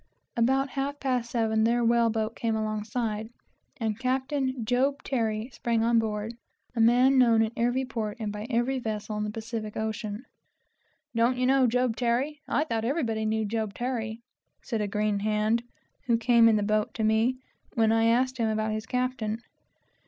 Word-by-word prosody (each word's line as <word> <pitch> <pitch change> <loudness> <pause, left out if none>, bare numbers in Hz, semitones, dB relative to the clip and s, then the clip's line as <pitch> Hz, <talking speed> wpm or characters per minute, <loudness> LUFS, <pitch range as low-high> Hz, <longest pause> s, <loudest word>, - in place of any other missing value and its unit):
About 265 +4 +2
half 280 +2 -3
past 250 -3 -1
seven 220 -2 +1
their 235 +1 +2
whale 235 0 +4
boat 220 0 -2
came 225 -1 -1
alongside, 215 0 -2 0.5
and 220 -4 -2
Captain 260 -1 -1
Job 270 +4 +1
Terry 225 -2 -1
sprang 230 -2 0
on 230 0 +4
board, 215 0 -2 0.4
a - - -2
man 250 +4 +5
known 230 -3 +5
in 220 - -1
every 245 +3 +1
port 225 -4 -4
and 215 -2 -3
by 210 +2 -6
every 255 +2 +1
vessel 215 -2 -4
in 210 - -1
the 210 - -2
Pacific 220 -1 -5
ocean. 220 +1 -4 0.9
"Don't 235 +2 +2
you 250 - +1
know 265 0 +4
Job 250 -1 +1
Terry? 255 +5 0
I 295 - +1
thought 230 -8 -2
everybody 230 -5 -1
knew 220 0 0
Job 215 -1 -2
Terry," 235 -2 -3 0.4
said 225 -3 -2
a 210 - 0
green 210 0 0
hand, 215 +2 +1 0.5
who 235 -2 +4
came 230 0 +5
in 220 - +4
the 210 - +1
boat, 215 0 0
to 220 - -1
me, 220 +4 +2 0.4
when 225 -1 +3
I 225 0 +3
asked 255 +3 +2
him 225 -1 +2
about 215 0 0
his 215 +1 -4
captain. 250 -3 -1
230 Hz, 175 wpm, -27 LUFS, 220-250 Hz, 0.9 s, man